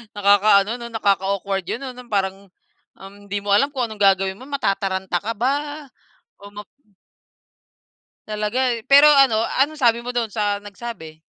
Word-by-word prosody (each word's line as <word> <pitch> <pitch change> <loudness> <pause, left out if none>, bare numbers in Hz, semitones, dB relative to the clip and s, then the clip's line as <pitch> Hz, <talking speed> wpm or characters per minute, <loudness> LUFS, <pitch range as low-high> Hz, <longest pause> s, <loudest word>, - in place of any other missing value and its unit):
Nakakaano 205 +1 +3
'no, 235 -1 -8
nakaka-awkward 195 -2 -1
'yon, - - -3
'no, 260 -2 -6
no'ng 250 -2 -14
parang, 195 -1 -2 0.5
um, 195 +1 -12
hindi 205 +1 -3
mo 200 0 -1
alam 275 +7 +2
kung 255 -4 -2
anong 215 -1 -11
gagawin 195 0 +2
mo 260 - -11
matataranta 190 -8 -2
ka 230 +2 -3
ba 290 +4 -2 0.5
o 200 0 -13
ma 210 0 -9 1.6
Talaga, 215 +5 -1
eh, 225 - -12
pero 285 +2 +7
ano 270 -6 +4 0.2
anong 300 +1 -1
sabi 235 -1 +3
mo 245 - -4
do'n 235 -3 -1
sa 205 -1 -2
nagsabi? 200 -7 -9
210 Hz, 160 wpm, -21 LUFS, 200-250 Hz, 1.6 s, pero